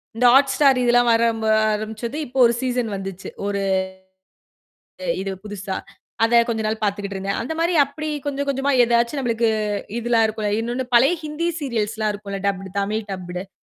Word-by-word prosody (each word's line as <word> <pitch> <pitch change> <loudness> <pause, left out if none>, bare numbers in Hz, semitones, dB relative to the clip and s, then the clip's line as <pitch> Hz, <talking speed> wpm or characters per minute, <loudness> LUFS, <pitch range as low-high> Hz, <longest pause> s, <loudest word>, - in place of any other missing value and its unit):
இந்த 245 - +1
Hotstar 275 +1 +5
இதெல்லாம் 245 0 +4
வரம்ப 230 -1 +1
வர 215 - +5 0.2
ஆரம்பிச்சது. 220 +5 -4
இப்போ 260 +1 -9
ஒரு 235 - +4
சீசன் 245 -3 -1
வந்துச்சு. 195 -1 -6 0.2
ஒரு 200 -1 -1 1.6
இது 195 0 -3
புதுசா. 200 -2 -5 0.5
அத 235 +1 +5
கொஞ்சம் 220 -1 -1
நாள் 220 0 -2
பாத்துகிட்டு 200 -1 -2
இருந்தேன். 195 +1 -2
அந்த 265 +7 -3
மாரி 340 +2 +1
அப்பிடி 305 +3 -5 0.2
கொஞ்சம் 280 0 -2
கொஞ்சமா 275 +1 0
எதாச்சும் 235 +4 +1
நம்மளுக்கு 230 -2 +1 0.5
இதெல்லாம் 235 -1 +2
இருக்கும். 215 -1 -3
இன்னொன்னு 245 +2 -3
பழைய 270 +9 +5
ஹிந்தி 305 +3 -2
சீரியல்ஸ்லாம் 220 -4 -1
இருக்கும். 200 -1 -6
டப்புடு. 195 -1 -3
தமிழ் 210 +1 -3
டப்புடு. 180 0 -6
230 Hz, 155 wpm, -22 LUFS, 205-255 Hz, 1.6 s, Hotstar